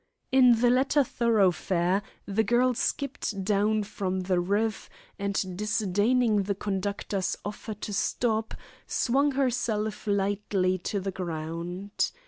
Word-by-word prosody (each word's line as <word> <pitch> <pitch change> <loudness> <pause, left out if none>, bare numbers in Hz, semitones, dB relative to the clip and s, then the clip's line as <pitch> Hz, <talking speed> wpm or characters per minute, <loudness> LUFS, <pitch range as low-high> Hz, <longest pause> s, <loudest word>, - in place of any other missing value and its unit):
In 250 -3 +6
the 245 -1 +5
latter 270 +3 +3
thoroughfare 195 -6 +2 0.2
the 205 +2 +1
girl 245 +4 +3
skipped 250 -5 -2
down 210 +2 +2
from 190 -2 -3
the 185 -1 +1
roof, 205 +5 -1 0.3
and 195 -2 -2
disdaining 210 +2 +2
the 200 +1 -2
conductor's 195 -1 -2
offer 210 +1 -5
to 205 0 -6
stop, 220 +1 0 0.3
swung 275 +3 +2
herself 225 -6 -1
lightly 200 -2 +1
to 200 +3 -2
the 195 0 -3
ground. 175 +2 -3
205 Hz, 115 wpm, -27 LUFS, 190-230 Hz, 0.3 s, In